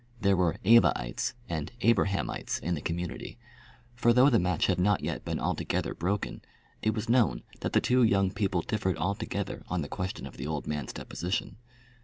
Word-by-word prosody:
There 100 -3 +3
were 90 0 +1
"Evaites" 110 - +4
and 80 -3 -3
"Abrahamites" 100 -4 +1
in 90 - -2
the 75 - -3
community; 85 +2 -4 0.6
for 120 0 +3
though 130 +4 +6
the 115 - +5
match 90 -1 +1
had 90 -2 +1
not 100 +2 +3
yet - - -3
been - - -2
altogether - - -1
broken, 95 +4 -2 0.4
it 110 0 +1
was 110 0 -3
known 115 - +3 0.2
that - - -3
the - - +4
two 125 +1 +3
young 100 -4 +3
people 95 -4 0
differed 95 -4 -1
altogether 100 +4 -2
on 90 -2 -1
the - - -5
question 90 +3 -4
of - - -10
the 65 - -4
old 75 -2 -3
man's 75 -4 -3
deposition. 90 +5 -3
95 Hz, 180 wpm, -29 LUFS, 85-110 Hz, 0.6 s, though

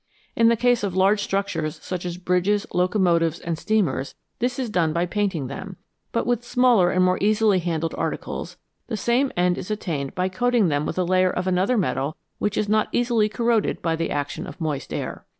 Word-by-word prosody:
In 230 - +4
the 235 - +4
case 245 +1 +2
of 195 -3 -2
large 195 +2 +3
structures, 165 -7 -2
such 180 -1 -4
as 175 0 -5
bridges, 180 +3 +1
locomotives, 175 -3 +2
and 170 -1 -3
steamers, 170 -8 -1 0.2
this 245 +1 -1
is 250 -4 -3
done 165 -5 +1
by 170 +2 +1
painting 185 -5 -1
them, 185 +9 -7 0.4
but 230 - 0
with 240 -1 0
smaller 240 -7 +4
arid 185 0 +2
more 185 0 +2
easily 210 -1 +3
handled 165 -2 -2
articles - - -4 0.3
the 225 - -3
same 245 +5 +1
end 180 0 +2
is 180 - -7
attained 165 -9 -3
by 185 -1 +1
coating 225 +1 +2
them 145 0 0
with - - -4
a 185 - +2
layer 185 +1 +3
of 180 0 -2
another 190 +6 +2
metal 140 - -1 0.2
which 210 0 -1
is 210 - +1
not 215 +1 +2
easily 235 -3 +2
corroded 230 0 +1
by 165 -1 +1
the 165 0 -2
action 145 -1 -3
of - - -10
moist 150 -4 -3
air. - - -4
185 Hz, 200 wpm, -23 LUFS, 170-215 Hz, 0.4 s, In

